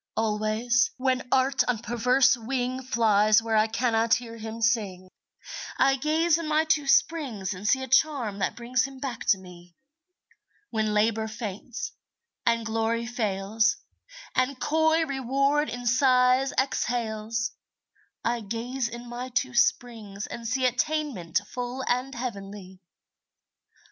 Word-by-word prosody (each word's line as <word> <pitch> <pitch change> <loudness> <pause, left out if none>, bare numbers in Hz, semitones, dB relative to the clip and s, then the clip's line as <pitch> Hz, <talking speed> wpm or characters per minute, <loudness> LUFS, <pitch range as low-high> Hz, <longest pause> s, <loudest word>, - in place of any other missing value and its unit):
Always, 220 +3 +1
when 255 -1 0
Art 265 +1 +3
on 250 -2 +1
perverse 245 +4 +3
wing 250 +2 -3
Flies 215 -4 +3
where 225 0 -2
I 215 0 +4
cannot 225 0 +2
hear 235 -1 -6
him 220 0 -7
sing, 205 -6 0 0.7
I 270 0 +4
gaze 315 +4 +2
in 330 - -4
my 310 +1 +3
two 300 -3 +1
springs 255 - +1
and 190 +3 -6
see 265 +4 +3
A - - -5
charm 260 -6 +2
that 190 - -1
brings 245 +1 0
him 270 -1 -9
back 255 -4 -5
to 195 - +5
me. 175 -2 -14 1.0
When 215 -2 0
Labor 220 +1 +2
faints, 220 - -6 0.6
and 230 -1 +2
Glory 225 +1 -1
fails, 220 -1 0 0.6
And 255 +1 0
coy 320 +2 +2
Reward 275 +2 0
in 245 0 -6
sighs 255 +1 +4
exhales, 230 -3 -1 0.7
I 235 +1 +1
gaze 235 +4 -3
in 240 +1 -8
my 245 +2 -6
two 255 +1 -1
springs 230 -5 0
and 235 -1 -7
see 255 +2 0
Attainment 250 - 0
full 250 +1 -5
and 250 +2 -1
heavenly. 200 -6 -7
240 Hz, 135 wpm, -26 LUFS, 220-260 Hz, 1.0 s, to